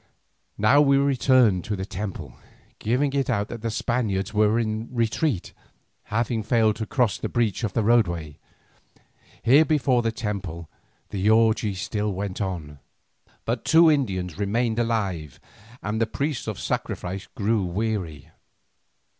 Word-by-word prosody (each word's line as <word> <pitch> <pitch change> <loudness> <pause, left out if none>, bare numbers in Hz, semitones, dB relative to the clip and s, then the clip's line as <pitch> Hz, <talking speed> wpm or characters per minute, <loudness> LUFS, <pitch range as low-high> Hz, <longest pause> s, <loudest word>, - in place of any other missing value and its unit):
Now 110 +8 +5
we 140 -1 +4
returned 130 -8 +3
to 105 - -2
the 95 -1 -4
temple, 90 - -6 0.5
giving 130 +5 0
it 140 -1 0
out 105 -4 0
that 115 - -7
the 115 - -2
Spaniards 110 -3 -1
were 105 +1 +3
in 110 0 -2
retreat, 115 - -1 0.5
having 115 +1 -1
failed 110 -1 +2
to 110 - -4
cross 120 -7 +1
the - - -3
breach 115 -2 0
in 110 - +1
the 115 - 0
roadway. 85 -10 +1 1.0
Here 140 +6 +6
before 135 -6 +2
the 115 -1 0
temple 100 -7 -5 0.4
the 100 +1 0
orgie 110 -2 +3
still 105 +1 -2
went 100 +1 -4
on. 80 -7 -4 0.7
But 115 0 -2
two 165 0 +6
Indians 95 - -1
remained 110 +3 0
alive; 95 - -2 0.4
and 105 +2 -2
the 115 - +2
priests 140 +2 -3
of 110 -3 -4
sacrifice 95 +2 -3
grew 110 -3 +1
weary. 90 -5 -3
110 Hz, 140 wpm, -24 LUFS, 95-120 Hz, 1.0 s, Here